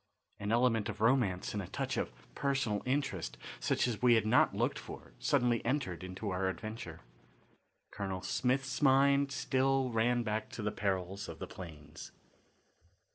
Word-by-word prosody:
An 100 +1 -2
element 115 -2 +3
of - - -5
romance 110 -6 +2
and 105 - -1
a 95 - -7
touch - - -2
of - - -1 0.2
personal 130 - 0
interest 135 - -1 0.2
such - - +1
as 115 -5 -3
we 120 -1 +6
had 110 -2 +2
not 110 - +4
looked - - 0
for - - -10
suddenly 120 -1 +2
entered 120 - -1
into 95 +3 -4
our 95 +1 0
adventure. 110 +4 -6 0.9
Colonel 95 -2 -4
Smith's 130 +2 0
mind 140 0 +5
still 135 -1 +1
ran 120 +2 +2
back 110 0 -2
to 110 - -5
the 105 - 0
perils 95 -1 -2
of - - -7
the - - -5
plains. 75 -5 -10
110 Hz, 155 wpm, -33 LUFS, 100-130 Hz, 0.9 s, we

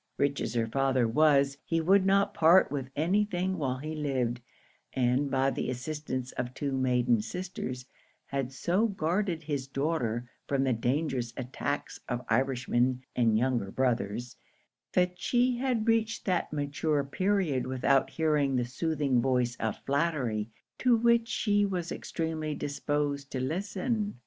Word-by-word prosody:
Rich 140 0 +1
as 115 - -3
her 115 -1 +2
father 130 0 +1
was, 140 +2 +3
he 165 - 0
would 190 +4 +4
not 200 +1 +3
part 170 +2 +5
with 135 -3 -3
any 180 +8 +2
thing 185 -2 -2
while 130 -3 -1
he 155 +4 -5
lived; 130 -5 -1 0.5
and, 130 +2 +1
by 135 0 +2
the - - -3
assistance 130 0 -4
of 125 +1 -4
two 140 -1 -2
maiden 125 -3 +2
sisters, 130 - -5 0.4
had 135 -2 -3
so 180 +10 +1
guarded 180 -2 -1
his 145 -3 -3
daughter 135 -5 -1 0.2
from 140 -1 +1
the 130 -2 +2
dangerous 125 0 -1
attacks 130 +3 -3
of 125 0 -3
Irishmen 125 +1 +1
and 115 -3 +3
younger 120 -4 0
brothers, 120 -1 -1 0.6
that 180 0 +1
she 245 +3 +2
had 245 -3 0
reached 225 -1 +1
that 180 -3 0
mature 145 0 0
period 175 -3 0
without 130 +1 +2
hearing 150 -4 +1
the 125 -1 +1
soothing 140 -1 0
voice 125 -1 +1
of 110 -2 -2
flattery, 135 -8 0 0.3
to 250 -2 +4
which 235 0 +3
she 205 -3 +1
was 180 -4 -2
extremely 160 -2 -3
disposed 145 -1 -2
to 130 - -2
listen. 200 - -2
140 Hz, 145 wpm, -29 LUFS, 125-175 Hz, 0.6 s, part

